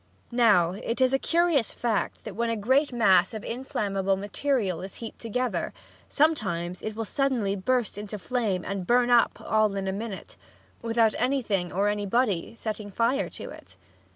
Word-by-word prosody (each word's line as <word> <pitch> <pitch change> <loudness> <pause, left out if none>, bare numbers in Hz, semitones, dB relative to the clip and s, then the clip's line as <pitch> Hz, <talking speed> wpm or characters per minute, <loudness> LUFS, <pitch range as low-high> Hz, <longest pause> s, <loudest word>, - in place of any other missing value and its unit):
Now, 210 -8 +4
it 220 +6 -4
is 260 0 +3
a 270 - +3
curious 335 -8 +2
fact 230 -4 -1
that 215 -4 -7
when 235 +2 0
a 230 - 0
great 260 +8 +2
mass 200 -5 +4
of 215 - -6
inflammable 205 -6 -1
material 205 - -1
is 190 +1 -8
heaped 230 - -8
together, 250 +2 -2 0.3
sometimes 180 - +1
it 215 -1 -5
will 225 0 -3
suddenly 245 -7 0
burst 215 +1 0
into 210 0 -6
flame 210 -4 -1
and 195 -2 -4
burn 245 0 +3
up 240 -1 +4
all 215 -2 +1
in 195 -1 -2
a - - 0
minute, 205 -1 -6 0.4
without 230 -1 +2
anything 225 -9 0
or 200 +3 +1
anybody 205 -1 0
setting 215 -2 -5
fire 235 +7 0
to - - -7
it. - - -14
220 Hz, 165 wpm, -27 LUFS, 195-245 Hz, 0.4 s, Now